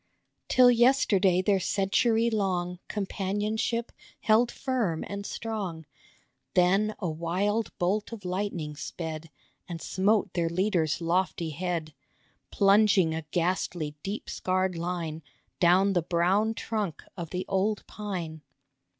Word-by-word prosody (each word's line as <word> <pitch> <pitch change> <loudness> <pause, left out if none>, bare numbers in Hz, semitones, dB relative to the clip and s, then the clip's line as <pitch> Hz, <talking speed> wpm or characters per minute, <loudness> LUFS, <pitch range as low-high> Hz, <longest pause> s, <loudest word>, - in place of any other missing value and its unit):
Till 250 -1 +7
yesterday 210 -7 +4
their 195 0 +3
century 225 +5 +2
long 180 -4 -1
Companionship 210 +3 -2 0.3
held 230 +2 +4
firm 235 -12 -1
and 200 0 -5
strong, 195 -8 -4 0.7
Then 195 +4 +3
a 185 - -3
wild 185 +7 -1
bolt 200 +5 0
of 215 -5 -8
lightning 180 -5 -3
sped 160 +1 -6 0.4
And 170 -1 -5
smote 200 +5 +1
their 170 -2 0
leader's 170 -3 0
lofty 170 -1 0
head, 165 -1 -3 0.6
Plunging 195 -4 +4
a 160 - -2
ghastly 175 -3 -1
deep 200 +6 -5
scarred 185 0 -1
line 165 -2 -3 0.4
Down 185 +3 +4
the 175 - +2
brown 185 +7 +1
trunk 210 -10 -3
of 170 -3 -6
the 180 +1 -3
old 195 +2 0
pine. 175 -7 -5
190 Hz, 115 wpm, -28 LUFS, 170-210 Hz, 0.7 s, Till